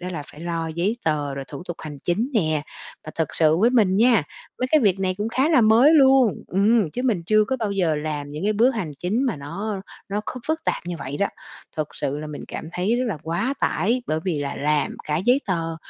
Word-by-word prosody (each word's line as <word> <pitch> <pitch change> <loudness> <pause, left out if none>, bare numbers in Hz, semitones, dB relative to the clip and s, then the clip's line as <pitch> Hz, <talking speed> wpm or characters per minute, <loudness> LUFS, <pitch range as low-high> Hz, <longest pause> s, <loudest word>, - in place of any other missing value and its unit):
đó 180 - -5
là 155 -4 -4
phải 150 - -13
lo 165 -1 -2
giấy 175 +8 -1
tờ 145 -3 0
rồi 135 0 -5
thủ 140 - -7
tục 175 - -4
hành 150 -2 -8
chính 200 - -1
nè. 155 -8 +1 0.4
Và 155 - -7
thật 160 -3 -2
sự 160 -1 +4
với 230 +5 +4
mình 205 -6 +3
nha, 230 -3 +5 0.4
mấy 255 - +1
cái 310 - +5
việc 195 -5 +2
này 185 -1 0
cũng 210 +2 -1
khá 265 +5 +1
là 310 -7 +5
mới 230 +8 +6
luôn 265 -6 +5
ừm, 200 -2 +2
chứ 250 - -4
mình 210 -9 +1
chưa 215 +5 +3
có 260 +5 -1
bao 220 -4 -2
giờ 180 -5 +1
làm 150 -1 -4
những 150 +5 -5
cái 210 - +2
bước 230 +5 +4
hành 180 -10 -3
chính 210 +8 0
mà 225 - -1
nó 190 +9 -4 0.3
nó 205 +1 -1
kh 235 - -6
phức 315 +1 -1
tạp - - -2
như 175 -1 -3
vậy 140 +2 -5
đó. 200 - +2 0.5
Thật 155 -1 -1
sự 140 +2 -2
là 155 - -6
mình 150 -1 -7
cảm 160 - -6
thấy 190 +7 0
rất 255 - 0
là 200 - -2
quá 185 - -1
tải, 240 +5 +1
bởi 155 +1 -1
vì 175 -6 -1
là 140 -1 -3
làm 150 0 0
cả 150 - -1
giấy 245 - +3
tờ, 165 -4 -2
185 Hz, 250 wpm, -23 LUFS, 155-225 Hz, 0.5 s, mới